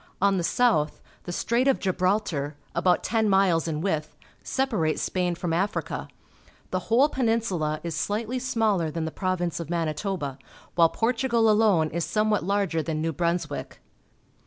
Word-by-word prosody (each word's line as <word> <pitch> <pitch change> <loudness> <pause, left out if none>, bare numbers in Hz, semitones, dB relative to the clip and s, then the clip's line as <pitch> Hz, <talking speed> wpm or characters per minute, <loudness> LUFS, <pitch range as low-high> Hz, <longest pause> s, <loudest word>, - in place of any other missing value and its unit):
On 195 0 +3
the 175 - -1
south 170 -7 +2 0.3
the 175 - -4
Strait 235 +8 +1
of 270 - +4
Gibraltar, 185 -6 0 0.2
about 180 -1 +2
ten 220 -2 +1
miles 190 -4 +3
in 155 -2 -2
width, 160 -5 -2 0.3
separates 215 - 0
Spain 180 -2 0
from 170 -1 -2
Africa. 195 +6 -2 0.6
The 185 - 0
whole 250 +6 +5
Peninsula 225 - 0
is 170 -1 -3
slightly 220 +9 -2
smaller 220 -9 +1
than 160 +1 -3
the 160 - -3
Province 180 -2 -2
of 165 -2 -6
Manitoba, 165 -3 -2 0.3
while 165 -1 +5
Portugal 230 0 +2
alone 205 -8 +3
is 170 +1 -1
somewhat 215 0 +1
larger 195 -3 0
than 155 0 -3
New 165 +1 -1
Brunswick. 170 -2 -2
185 Hz, 150 wpm, -26 LUFS, 165-220 Hz, 0.6 s, whole